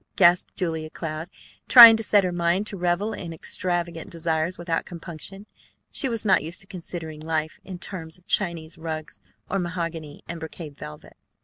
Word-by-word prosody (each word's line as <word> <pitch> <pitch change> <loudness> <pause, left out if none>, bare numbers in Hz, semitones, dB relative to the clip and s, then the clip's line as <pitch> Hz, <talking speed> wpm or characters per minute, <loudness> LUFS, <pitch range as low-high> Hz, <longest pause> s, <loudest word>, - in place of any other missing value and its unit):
gasped 175 -1 +4
Julia 160 -3 -3
Cloud, 155 +1 -5 0.4
trying 235 -3 +12
to 220 - -3
set 205 -2 +4
her 180 - 0
mind 175 +3 +1
to 210 - -4
revel 180 +4 0
in 170 -5 -6
extravagant 170 0 -2
desires 165 +1 -1
without 170 -1 -2
compunction. 175 +3 -8 0.5
She 270 - 0
was 230 -2 -2
not 190 -3 +4
used 165 +4 -3
to - - -7
considering 165 -4 -7
life 155 0 -3
in 185 -2 -7
terms 165 -3 -5
of 180 - -26
Chinese 165 -4 0
rugs 155 -9 -6 0.3
or 195 - -1
mahogany 165 -4 -5
and 170 -1 -6
brocade 160 -2 -8
velvet. 75 - -11
170 Hz, 170 wpm, -25 LUFS, 160-185 Hz, 0.5 s, trying